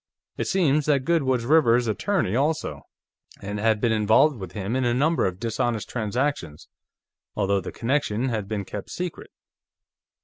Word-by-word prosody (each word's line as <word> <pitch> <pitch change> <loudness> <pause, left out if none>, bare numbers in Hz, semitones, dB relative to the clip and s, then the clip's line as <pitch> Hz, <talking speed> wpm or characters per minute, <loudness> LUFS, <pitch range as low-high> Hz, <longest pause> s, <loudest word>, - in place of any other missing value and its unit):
It - - -3
seems 155 -6 +2
that 140 -3 +2
Goode 170 0 +2
was 130 -3 0
Rivers's 125 -5 +4
attorney, 110 - 0
also, 140 - -1 0.5
and 100 +1 -5
had 110 0 +2
been 115 +1 +1
involved 110 +7 +3
with 95 -3 -8
him 105 +2 -3
in 130 - +1
a 120 -1 +1
number 155 -1 +2
of 90 0 -5
dishonest 115 0 -2
transactions, 115 - -2 0.7
although 100 -1 +1
the 90 - -6
connection 130 -1 -1
had 110 -4 -3
been 100 -2 -3
kept 100 +1 -7
secret." 180 -2 -5
120 Hz, 160 wpm, -24 LUFS, 105-145 Hz, 0.7 s, Rivers's